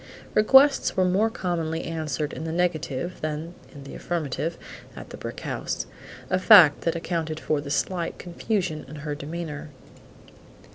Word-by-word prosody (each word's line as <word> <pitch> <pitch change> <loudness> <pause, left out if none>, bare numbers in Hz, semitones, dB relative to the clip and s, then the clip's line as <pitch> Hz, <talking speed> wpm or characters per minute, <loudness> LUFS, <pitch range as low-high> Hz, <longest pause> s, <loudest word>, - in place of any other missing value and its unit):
Requests 270 +5 +5
were 185 - +4
more 195 +5 +2
commonly 165 -6 -2
answered 155 -3 -3
in - - -6
the 160 - -3
negative 175 -1 -2
than 155 +2 -4 0.2
in 140 0 -11
the 135 - -10
affirmative 165 -1 -3 0.4
at - - -10
the - - -7
brick - - -7
house, - - -3 0.5
a 185 - +3
fact 185 -8 +8
that 165 - 0
accounted 165 -2 -3
for 155 -2 -1
the 145 - -8
slight 170 +3 -1
confusion 180 -3 -2
in 150 - -10
her 150 0 -4
demeanor. 150 0 -6
165 Hz, 150 wpm, -25 LUFS, 150-180 Hz, 0.5 s, fact